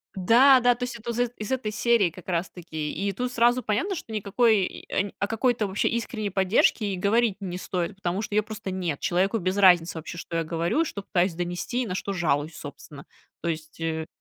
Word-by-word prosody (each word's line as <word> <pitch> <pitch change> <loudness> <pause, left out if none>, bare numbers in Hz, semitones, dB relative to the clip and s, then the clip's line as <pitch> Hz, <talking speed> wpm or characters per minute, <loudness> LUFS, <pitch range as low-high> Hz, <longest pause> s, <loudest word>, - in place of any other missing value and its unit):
Да, 250 +8 +6
да, 245 0 +5
то 245 - -6
есть 245 -1 -4
это 235 +1 -5
из 245 +1 0
из 215 +4 -5
этой 240 -5 -1
серии 220 -4 +3
как 180 +3 -14
раз 175 0 -1
таки, 160 -4 -5
и 200 +4 -2
тут 245 +5 -3
сразу 240 +1 +3
понятно, 245 - -1
что 230 - -8
никакой 210 0 +2
и 200 +2 -3
о 200 - 0
какой-то 225 -1 +1
вообще 190 +2 0
искренней 225 -3 -2
поддержке 195 +3 +2
и - - -3
говорить 210 +2 +2
не 180 -3 -5
стоит, 185 +1 -3
потому 185 +1 -2
что 215 - -6
её 215 - +3
просто 215 -3 -6
нет. 175 -6 -2
Человеку 190 +5 +1
без 185 +1 -1
разницы, 175 -4 +5
вообще, 160 +2 -7
что 165 0 -4
я 165 - 0
говорю, 170 - 0
что 200 - -5
пытаюсь 180 -2 +1
донести 175 +8 -2
и - - -4
на 180 - -3
что 200 +1 -3
жалуюсь, 155 -3 0
собственно, 145 0 -10 0.4
то 170 - -2
есть, 160 0 -5
э 160 -1 -2
195 Hz, 215 wpm, -26 LUFS, 175-230 Hz, 0.4 s, Да